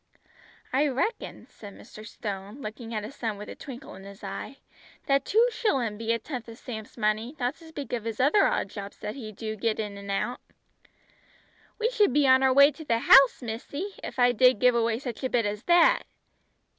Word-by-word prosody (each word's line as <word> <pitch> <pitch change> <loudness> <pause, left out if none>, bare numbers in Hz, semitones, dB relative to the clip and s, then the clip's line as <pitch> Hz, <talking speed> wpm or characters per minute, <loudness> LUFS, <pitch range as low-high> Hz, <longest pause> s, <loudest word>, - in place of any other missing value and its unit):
"I 285 +3 +3
reckon," 285 - -3
said 205 -2 -12
Mr. 215 - -12
Stone 205 +1 -7
looking 225 -1 -7
at 215 -2 -3
his 220 +6 -8
son 220 -3 -3
with 210 - -9
a - - -8
twinkle 260 -2 -10
in 190 - -12
his 200 +1 -12
eye, 200 +7 -6 0.5
"that 275 0 +2
two 455 +3 +4
shillin' 265 - 0
be 225 0 -1
a 230 - +2
tenth 240 -1 -7
o' 225 - -9
Sam's 225 -2 -9
money, 220 +5 -1
not 245 +1 0
to 330 - -16
speak 290 -5 -7
of 235 -3 -2
his 225 -1 -4
other 290 +11 +4
odd - - -1
jobs 200 -1 -8
that 210 - -5
he 230 -5 -8
do 215 +1 -5
get 220 +1 -1
in 205 -2 -4
an' 200 0 -10
out." 220 +5 -2 1.4
"We 460 +2 0
should 420 - +3
be 290 -1 +3
on 260 0 +6
the 265 0 +4
way 280 +2 +7
to 315 - -11
the 235 -6 +1
House, 270 +2 +6
missy, 255 - -5
if - - -7
I 245 -1 +5
did 250 0 +4
give 250 +4 +4
away 230 -1 +1
such 245 -1 -7
a 260 - 0
bit 235 -3 +1
as 205 +2 -4
that!" 350 +8 +5
240 Hz, 210 wpm, -27 LUFS, 215-275 Hz, 1.4 s, way